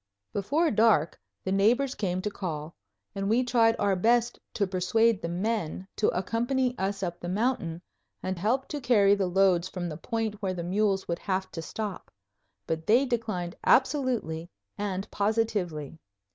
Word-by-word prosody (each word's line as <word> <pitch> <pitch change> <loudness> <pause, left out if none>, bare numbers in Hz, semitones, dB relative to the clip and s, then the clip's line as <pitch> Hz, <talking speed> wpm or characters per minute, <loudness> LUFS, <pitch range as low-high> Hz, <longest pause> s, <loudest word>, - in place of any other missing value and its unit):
Before 295 - +1
dark 215 -8 +3 0.2
the 190 - -2
neighbors 240 +8 +3
came 185 -5 -2
to 210 - -2
call, 160 -5 -5 0.4
and 195 0 -2
we 235 +4 +3
tried 230 -2 +3
our 200 -2 +2
best 235 +5 +2 0.2
to 200 - +2
persuade 200 +4 +2
the - - -3
men 190 -1 -2
to 210 - +2
accompany 240 +7 0
us 195 +1 -2
up 175 -1 -3
the 175 - -5
mountain 185 -5 -1 0.4
and 185 -1 -2
help 240 +8 0
to 295 -2 -4
carry 210 -5 +5
the 200 -2 +1
loads 185 -1 +3
from 175 -2 -4
the 155 - -6
point 220 +1 -3
where 190 -2 -1
the 170 - -4
mules 195 +2 +1
would 170 0 -2
have 190 -1 -2
to 165 - -5
stop; 205 +3 -5 0.6
but 160 0 -3
they 245 +6 +5
declined 220 -8 -2
absolutely 245 - +2 0.3
and 200 -1 -3
positively. 200 -8 -1
200 Hz, 160 wpm, -28 LUFS, 180-230 Hz, 0.6 s, carry